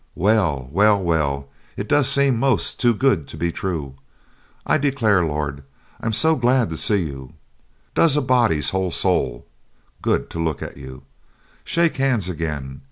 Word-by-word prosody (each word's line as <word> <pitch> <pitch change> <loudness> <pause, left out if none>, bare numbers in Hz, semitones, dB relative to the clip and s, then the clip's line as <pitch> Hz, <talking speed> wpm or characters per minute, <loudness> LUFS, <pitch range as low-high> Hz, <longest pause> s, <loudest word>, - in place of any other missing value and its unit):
Well, 90 - +1
well, 105 +4 +4
well, 75 -6 -1 0.3
it 100 - -4
does 145 -2 +4
seem 140 -2 +3
most 135 0 +1
too 120 -2 +3
good 105 - +1
to - - -10
be 85 +2 -1
true, 80 -8 -4 0.7
I - - +2
declare! 120 -10 +2
Lord, 75 -3 -3 0.4
I'm 115 - -2
so 140 +9 +2
glad 125 - +2
to - - -3
see 100 +1 +1
you! 70 -2 -8 0.6
Does 155 -3 +3
a - - +2
body's 120 - +2
whole 95 -1 -1
soul 70 -10 -1 0.6
good - - -1
to 85 - -3
look 80 -3 -2
at - - -8
you! 65 0 -10 0.6
Shake 170 -1 0
hands 130 -8 +1
again! 75 -6 -5
95 Hz, 160 wpm, -21 LUFS, 75-125 Hz, 0.7 s, well